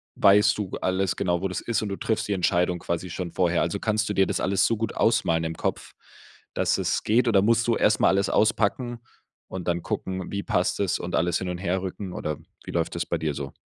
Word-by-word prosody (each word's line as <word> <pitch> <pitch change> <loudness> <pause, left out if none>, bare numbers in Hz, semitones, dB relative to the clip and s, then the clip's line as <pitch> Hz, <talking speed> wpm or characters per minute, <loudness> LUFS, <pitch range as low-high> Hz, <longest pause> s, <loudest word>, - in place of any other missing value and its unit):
weißt 105 +1 +5
du 105 -3 -3
g - - -5
alles 95 0 0
genau, 90 -2 0
wo 95 - 0
das 95 - -4
ist 115 -2 -1
und 105 - -3
du 100 - -4
triffst 110 -1 -1
die 100 - 0
Entscheidung 90 -1 +1
quasi 85 +2 -3
schon 85 0 -5
vorher? 90 -1 +2
Also, 85 +4 -1
kannst 110 0 0
du - - 0
dir 95 -1 +3
das - - -1
alles 95 0 +2
so 115 - +1
gut 115 - -2
ausmalen 85 -8 +2
im 80 0 -3
Kopf, - - -3 0.6
dass - - +1
es - - -1
geht 120 +3 +2
oder 100 -4 +4
musst 115 +3 +2
du 115 - +3
erst 105 - +3
mal - - +4
alles 100 +1 +2
auspacken 115 +2 +1 0.5
und 95 -2 -7
dann 85 -1 0
gucken, 95 -1 -4
wie 100 0 -3
passt 90 - 0
es 100 -3 0
und 85 - -3
alles 85 0 +1
hin 95 - -4
und 90 - -3
her 90 +1 -1
rücken 95 0 -5
oder 75 -3 -3 0.3
wie - - -7
läuft 85 -1 -1
das 85 - -2
bei 85 - -1
dir 80 -2 -2
so? 70 -1 -6
95 Hz, 245 wpm, -25 LUFS, 85-105 Hz, 0.6 s, weißt